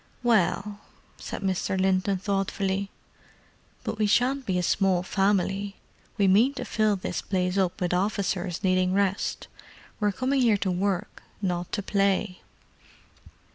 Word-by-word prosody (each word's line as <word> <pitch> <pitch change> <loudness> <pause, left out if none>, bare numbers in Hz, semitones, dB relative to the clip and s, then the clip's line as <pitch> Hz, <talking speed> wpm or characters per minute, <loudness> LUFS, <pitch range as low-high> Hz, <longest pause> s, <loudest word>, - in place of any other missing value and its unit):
"Well——" 210 -2 +1 0.4
said - - -6
Mr. 190 0 -1
Linton 190 +1 +2
thoughtfully. 195 0 -1 0.9
"But 220 - -4
we 215 - +3
shan't 250 +6 +2
be 185 -2 +1
a 180 - 0
small 185 0 +2
family—we 195 +1 -1
mean 225 +9 +4
to - - -4
fill 215 -2 +1
this 185 - -4
place 180 -1 -1
up 190 -3 0
with 180 -1 0
officers 190 -1 -1
needing 185 -1 +2
rest. 200 0 0 0.5
We're 210 -1 +2
coming 260 +7 0
here 225 -4 +4
to 190 -1 -1
work, 185 0 -2 0.2
not 180 -3 -2
to 205 - -1
play." 195 -1 0
195 Hz, 135 wpm, -26 LUFS, 185-205 Hz, 0.9 s, mean